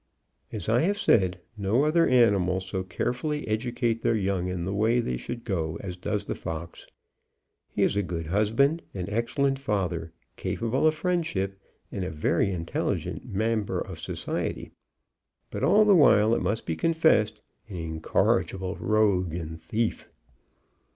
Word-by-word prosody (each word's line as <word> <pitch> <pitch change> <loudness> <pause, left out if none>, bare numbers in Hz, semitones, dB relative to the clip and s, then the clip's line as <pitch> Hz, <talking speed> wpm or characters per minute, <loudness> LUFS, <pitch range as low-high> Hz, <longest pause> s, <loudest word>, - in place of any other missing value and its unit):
As 105 -5 -5
I 115 +2 +3
have 200 +5 +1
said, 95 - +3 0.2
no 110 +7 +1
other 165 +2 +3
animals 95 -7 +3
so 95 0 -3
carefully 125 - -2
educate 115 +1 -1
their 115 - +2
young 95 -3 0
in 90 -2 -3
the 95 - -2
way 110 +4 +2
they 65 - -1
should 115 - -6
go, 85 -7 -2
as 90 -2 -6
does 105 +3 -3
the - - -2
fox. 80 +1 -7 0.8
He - - 0
is - - +2
a 100 - +2
good 85 -3 -4
husband, 115 - +2
an 90 +1 -4
excellent 135 +5 0
father, 90 -9 -2 0.3
capable 120 +6 0
of 155 - +2
friendship, 150 - -1 0.3
and 95 - -3
a 90 - -2
very 80 +5 +1
intelligent 85 -2 -3
member 110 +1 0
of - - -6
society; - - -4 0.8
but - - -4
all 215 +1 +5
the 205 - +6
while, 110 - +5
it - - +1
must 110 +2 -1
be 80 - -2
confessed, 160 - +2 0.3
an 100 - -7
incorrigible 85 +3 0
rogue 100 -6 +2
and 80 -1 -6
thief. 110 +7 -2
105 Hz, 150 wpm, -27 LUFS, 90-120 Hz, 0.8 s, the